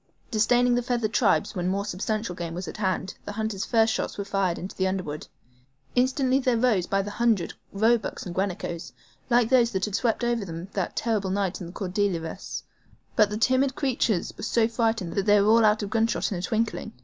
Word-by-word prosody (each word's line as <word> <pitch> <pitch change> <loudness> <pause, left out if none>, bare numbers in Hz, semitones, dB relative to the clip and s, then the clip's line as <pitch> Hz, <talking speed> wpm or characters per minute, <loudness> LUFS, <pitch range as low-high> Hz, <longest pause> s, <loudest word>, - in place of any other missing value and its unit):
Disdaining 245 +3 +3
the 245 - +2
feathered 235 -3 -1
tribes 210 -3 +2
when 180 -2 -2
more 200 +2 0
substantial 210 +1 -2
game 170 -1 -5
was 180 +1 -5
at - - -7
hand, 190 -2 -1
the 205 - -5
hunters' 220 -2 -2
first 225 -2 +3
shots - - -3
were 200 - -3
fired 195 -3 0
into 185 - -7
the 190 - +1
underwood. 185 -6 -4 0.7
Instantly 260 +1 +2
there 255 -3 +1
rose 225 -7 +2
by 195 0 +1
the 205 - -6
hundred 220 -6 +1 0.2
roebucks 220 +2 +1
and 175 - -5
guanacos, 175 -3 -3 0.4
like 240 -2 +4
those 245 -3 +5
that 190 -1 0
had 210 - -6
swept 230 +2 0
over 240 -2 +1
them 170 0 -7
that 190 -3 -2
terrible 215 -5 0
night 195 -1 -1
on 175 - -5
the 175 - -10
Cordilleras, 185 -3 -2 0.5
but 215 -2 +5
the 210 - -3
timid 260 +4 +2
creatures 240 - 0
were - - -10
so 225 0 +2
frightened 225 -6 -1
that 195 0 -1
they 205 0 +6
were 205 +2 +4
all 230 0 +6
out 215 0 +3
of 200 - -5
gunshot 225 0 +1
in 185 - -2
a - - -4
twinkling. 220 +3 -2
210 Hz, 210 wpm, -26 LUFS, 190-230 Hz, 0.7 s, they